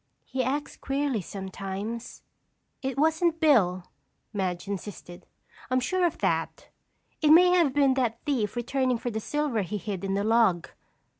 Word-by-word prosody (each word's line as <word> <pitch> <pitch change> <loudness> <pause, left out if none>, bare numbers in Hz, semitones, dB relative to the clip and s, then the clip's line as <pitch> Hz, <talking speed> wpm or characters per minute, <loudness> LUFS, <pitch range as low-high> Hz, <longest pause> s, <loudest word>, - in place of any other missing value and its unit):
"He 260 -1 -2
acts 280 +4 -3
queerly 275 -5 -1
sometimes." 195 +4 -6 0.6
"It 265 -1 -3
wasn't 320 +2 +2
Bill," 200 - +3 0.5
Madge 185 -2 -2
insisted. 190 -2 -7 0.4
"I'm 255 0 +2
sure 355 +8 +1
of 330 - -5
that. - - -2 0.5
It 305 - +3
may 355 +3 +7
have 345 -6 +4
been 275 -2 +4
that 245 -4 0
thief 240 -8 -1
returning 255 +1 0
for 240 +1 -4
the 220 - -2
silver 290 -1 -1
he 200 +3 -3
hid 200 -2 -5
in 195 0 -1
the 200 - 0
log." 220 -6 +3
240 Hz, 150 wpm, -27 LUFS, 200-285 Hz, 0.6 s, may